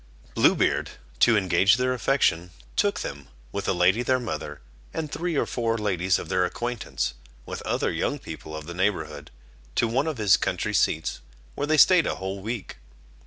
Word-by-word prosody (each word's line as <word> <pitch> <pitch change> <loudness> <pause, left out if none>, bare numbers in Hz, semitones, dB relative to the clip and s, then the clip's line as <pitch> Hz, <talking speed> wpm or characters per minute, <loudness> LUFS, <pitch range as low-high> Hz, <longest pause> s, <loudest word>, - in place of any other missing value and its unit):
Blue - - +4
Beard, - - +1 0.3
to 115 -2 +5
engage 100 +2 +4
their 125 0 +1
affection, 105 -10 +1 0.3
took 205 -1 +1
them, 70 -1 -6 0.2
with 100 - -4
the - - +1
lady 90 +6 +3
their 130 +1 +2
mother, 110 -11 -5 0.4
and 155 -3 -3
three 175 -1 -2
or - - +2
four 115 -2 -1
ladies 95 -4 +1
of - - -6
their 90 +2 +1
acquaintance, 80 - -3 0.3
with - - -6
other - - 0
young - - -1
people 80 - -8
of 80 - -8
the 85 - -7
neighbourhood, 80 -6 -2 0.5
to 120 - +2
one 130 +7 0
of 155 -4 -2
his 105 -4 +5
country - - -2
seats, 80 0 +1 0.3
where 145 - -3
they 155 0 +3
stayed 180 +1 +6
a - - -1
whole 95 +1 -5
week. 110 +1 -5
105 Hz, 180 wpm, -25 LUFS, 90-125 Hz, 0.5 s, stayed